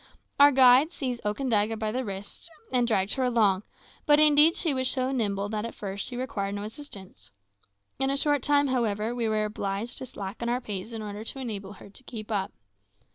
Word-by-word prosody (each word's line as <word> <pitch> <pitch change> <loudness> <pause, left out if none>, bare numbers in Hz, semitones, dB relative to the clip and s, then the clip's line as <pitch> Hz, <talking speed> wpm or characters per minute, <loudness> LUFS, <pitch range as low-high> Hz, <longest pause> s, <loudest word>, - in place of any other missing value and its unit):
Our 285 0 +8
guide 260 +3 +6
seized 255 -7 -4
Okandaga 220 0 0
by 215 -1 -2
the 255 +3 -2
wrist 200 - -8 0.2
and 245 -2 +2
dragged 200 -3 +1
her 265 - -1
along; 215 -6 +2 0.5
but 295 0 +6
indeed 305 +2 +7
she 325 -5 0
was 260 -1 0
so 255 -1 0
nimble 205 -6 -1
that 210 -1 -3
at 230 - -6
first 200 -1 -4
she 245 - -5
required 205 -6 -3
no 205 - -5
assistance. 215 -5 -10 0.7
In 270 0 +1
a 275 - 0
short 290 -1 +3
time, 285 0 +2
however, 225 -3 -1
we 235 -2 -1
were 215 0 0
obliged 205 +2 -4
to 260 - -7
slacken 205 +3 -6
our 245 +1 0
pace 210 -3 -6
in 225 -1 -6
order 210 0 -6
to 270 - -3
enable 210 -6 -6
her 200 - -14
to 260 - -12
keep 225 -3 -8
up. 200 -2 -1
230 Hz, 200 wpm, -27 LUFS, 205-260 Hz, 0.7 s, Our